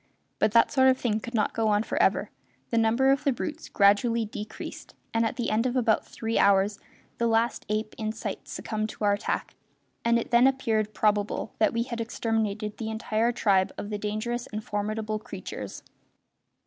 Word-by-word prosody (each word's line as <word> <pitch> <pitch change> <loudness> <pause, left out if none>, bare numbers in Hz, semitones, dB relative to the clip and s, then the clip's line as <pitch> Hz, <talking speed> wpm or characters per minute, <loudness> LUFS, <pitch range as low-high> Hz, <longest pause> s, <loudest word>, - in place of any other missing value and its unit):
But 215 - +3
that 230 - +5
sort 265 -1 +4
of 260 - +3
thing 220 -4 0
could 240 +2 -7
not 215 - +1
go 225 -1 +1
on 210 0 +3
for - - -1
ever; - - +2 0.4
the 230 - +1
number 230 +4 +3
of 275 - +1
the 280 - +3
brutes 305 +5 -5
gradually 220 +3 +3
decreased, 210 0 -8 0.2
and 225 0 +2
at 225 - -1
the 240 - -2
end 225 +4 +2
of 250 - -2
about 230 -4 +2
three 225 0 -2
hours 200 +1 +3 0.4
the 235 - +2
last 230 +1 +1
ape 215 0 -1
in 215 -1 -1
sight 220 - -6
succumbed 215 -1 -3
to - - -8
our 205 -1 +4
attack, 205 - -2 0.5
and 235 0 +3
it 235 - -3
then 240 +2 +6
appeared 220 -5 0
probable 210 0 0
that 215 - +4
we 230 0 0
had 235 -1 -4
exterminated 220 -2 -2
the 220 -1 -4
entire 220 +1 0
tribe 195 -5 +2
of 205 - -5
the 210 - -2
dangerous 215 +4 -3
and 215 0 -5
formidable 215 +1 -2
creatures. - - -7
220 Hz, 190 wpm, -27 LUFS, 210-235 Hz, 0.5 s, then